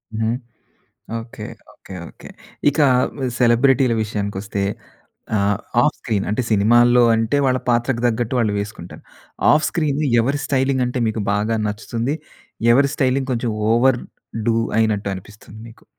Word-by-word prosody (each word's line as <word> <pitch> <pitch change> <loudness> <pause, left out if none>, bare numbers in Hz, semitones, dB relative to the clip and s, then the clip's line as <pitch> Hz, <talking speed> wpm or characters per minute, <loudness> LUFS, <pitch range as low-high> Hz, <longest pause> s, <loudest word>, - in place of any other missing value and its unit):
హ్మ్. 110 +1 0 0.8
Okay. 115 +1 -9 0.3
Okay. 95 - -13 0.2
Okay. - - -14 0.4
ఇక 145 - -6 0.2
ఆహ్, 125 - +1 0.3
సెలబ్రిటీల 125 +1 +4
విషయానికొస్తే 100 -1 -4 0.8
ఆహ్, 100 0 +1 0.2
ఆఫ్ - - +2
స్క్రీన్ 105 -4 -2
అంటే 110 +5 0
సినిమాల్లో 120 +4 +5
అంటే 115 +5 0
వాళ్ళ 130 -1 +2
పాత్రకు 120 0 +1
తగ్గట్టు 120 0 0
వాళ్ళు 110 -3 +1
వేసుకుంటారు. 100 -4 -8 0.5
ఆఫ్ 155 - +3
స్క్రీన్ 150 -3 -1 0.2
ఎవరి 140 +5 -1
స్టైలింగ్ 135 -1 +1
అంటే 125 +1 -2
మీకు 110 0 -2
బాగా 105 +2 0
నచ్చుతుంది? 115 +6 -3 0.6
ఎవరి 140 +3 +4
స్టైలింగ్ 135 0 0
కొంచెం 120 -1 -1 0.2
ఓవర్ 120 +2 +3 0.5
డు 115 - +3 0.2
అయినట్టు 105 -2 +1
అనిపిస్తుంది? 105 +2 -13
మీకు 115 - -19
115 Hz, 130 wpm, -20 LUFS, 105-130 Hz, 0.8 s, సినిమాల్లో